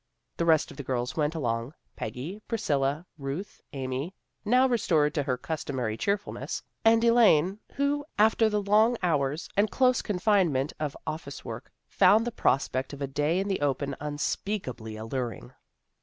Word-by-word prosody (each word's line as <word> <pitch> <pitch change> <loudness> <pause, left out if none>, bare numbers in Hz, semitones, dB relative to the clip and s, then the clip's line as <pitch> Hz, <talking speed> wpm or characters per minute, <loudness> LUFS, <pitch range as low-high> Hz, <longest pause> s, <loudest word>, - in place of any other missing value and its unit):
The 170 - 0
rest 160 -2 +3
of - - -13
the 140 - -5
girls 125 -1 -2
went 150 +1 0
along, 120 -2 -2 0.2
Peggy, 140 - -6
Priscilla, 145 - 0
Ruth, 140 +8 -5
Amy 135 +6 -4 0.3
now 250 +5 +4
restored 165 - +2
to 150 - 0
her 130 -3 -1
customary 130 -7 -3
cheerfulness 200 - -2 0.2
and 225 0 +5
Elaine, 210 -6 +4
who, 285 +1 0
after 220 +1 +4
the 210 -1 0
long 215 +4 +4
hours 150 -2 0
and 205 +2 +3
close 255 -2 +3
confinement 180 -8 +1
of 150 -2 -3
office 155 -3 -6
work, 115 0 -7 0.2
found 205 +4 +5
the 240 - -2
prospect 130 - 0
of 140 - -8
a - - +1
day 150 +5 0
in 195 +1 0
the 195 -5 -1
open 140 -1 0
unspeakably 145 - -3
alluring. 115 - -5
155 Hz, 155 wpm, -28 LUFS, 135-205 Hz, 0.3 s, and